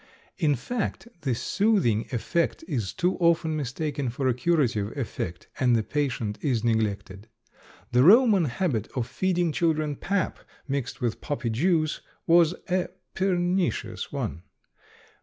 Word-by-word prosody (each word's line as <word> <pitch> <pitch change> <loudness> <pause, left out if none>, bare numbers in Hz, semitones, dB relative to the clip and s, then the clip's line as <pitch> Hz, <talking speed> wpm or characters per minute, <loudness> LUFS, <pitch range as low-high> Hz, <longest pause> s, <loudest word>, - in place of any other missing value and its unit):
In 150 -5 +3
fact, 230 - -3
the 130 -5 0
soothing 190 - +1
effect 165 +7 -1
is 120 - -2
too 180 +2 0
often 170 -2 +2
mistaken 145 -1 -2
for 130 +3 -2
a 130 - +3
curative 125 -6 0
effect 90 -9 -4
and 125 -2 +4
the 110 - +1
patient 120 -6 -2
is 125 -6 0
neglected. 105 -3 -1 0.6
The 125 - +4
Roman 205 - +6
habit 125 - -1
of 125 -3 0
feeding 175 +5 0
children 155 -2 0
pap 190 +4 -1 0.3
mixed 135 -1 -3
with 120 -2 -1
poppy 140 -6 -2
juice 155 +5 +1 0.2
was 170 0 +5
a 185 -1 +1 0.3
pernicious 185 -1 0
one. 85 - -3
145 Hz, 130 wpm, -26 LUFS, 120-175 Hz, 0.6 s, Roman